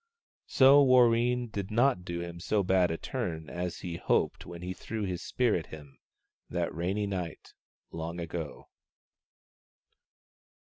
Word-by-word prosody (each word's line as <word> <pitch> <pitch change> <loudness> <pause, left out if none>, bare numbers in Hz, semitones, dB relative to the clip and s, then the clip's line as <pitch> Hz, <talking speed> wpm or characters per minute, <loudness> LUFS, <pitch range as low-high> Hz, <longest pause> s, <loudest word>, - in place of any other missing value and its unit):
So 140 +2 +7
Warreen 125 -2 +4
did 100 -1 -4
not 115 -3 +2
do 85 -1 -4
him 85 0 -7
so 100 +4 0
bad 95 -1 +3
a 80 - -2
turn 80 -2 -4
as 90 0 -4
he 85 -2 -5
hoped - - 0
when 85 0 -8
he 90 +1 -3
threw 110 +3 -5
his 90 -3 -3
spear 125 -4 +1
at 80 - -3
him 75 -3 -12 0.5
that - - -2
rainy 95 +5 -1
night 90 -5 -5 0.4
long 85 +1 -5
ago. 85 -2 -6
90 Hz, 140 wpm, -30 LUFS, 85-115 Hz, 0.5 s, So